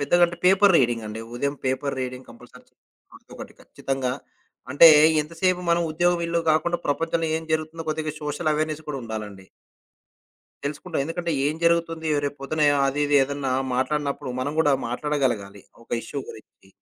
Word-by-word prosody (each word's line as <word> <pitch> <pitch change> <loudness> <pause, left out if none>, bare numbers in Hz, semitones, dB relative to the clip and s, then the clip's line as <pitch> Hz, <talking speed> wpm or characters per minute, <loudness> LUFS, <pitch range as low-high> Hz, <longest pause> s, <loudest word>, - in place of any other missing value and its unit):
పెద్దగా 175 +5 +2
అంటే, 170 0 -8
paper 195 +1 +5
reading 120 -4 +1
అండి. 110 +1 -6
ఉదయం 140 +3 -2
పేపర్ 135 +1 -1
రీడింగ్ 130 0 -6
కంపల్సరీ 125 +1 -16
చ - - -37 0.4
రోజుకొకటి - - -12
ఖచ్చితంగా. 135 -2 -3 0.6
అంటే 155 +5 +8 0.3
ఎంతసేపు 175 +3 -1
మనం 170 0 +3
ఉద్యోగం 175 +2 +1
ఇల్లు 170 0 0
గాకుండా 170 +3 +1
ప్రపంచంలో 165 +3 0
ఏం - - -9
జరుగుతుందో 160 +1 -2
కొద్దిగా 155 -1 -3
సోషల్ 150 +2 -2
అవేర్నెస్ 155 0 -2
కూడా 140 -2 -3
ఉండాలండి. 105 -4 -7 1.2
తెలుసుకుంటాం. 150 +3 -3
ఎందుకంటే 165 +2 -3
ఏం 150 - 0
జరుగుతుంది? 165 -1 +1 0.2
రేపొద్దున 145 +2 -3 0.2
ఆ - - +2
అది 140 +2 -2
ఇది 145 - 0
ఏదన్నా 140 -1 -3 0.2
మాట్లాడినప్పుడు 140 0 -2
మనం 140 +3 -2
గూడా 145 -3 +4 0.2
మాట్లాడగలగాలి. 120 -7 -2 0.2
ఒక - - -24
ఇష్యూ 140 - -6
గురించి. 95 -3 -16
145 Hz, 150 wpm, -24 LUFS, 130-165 Hz, 1.2 s, అంటే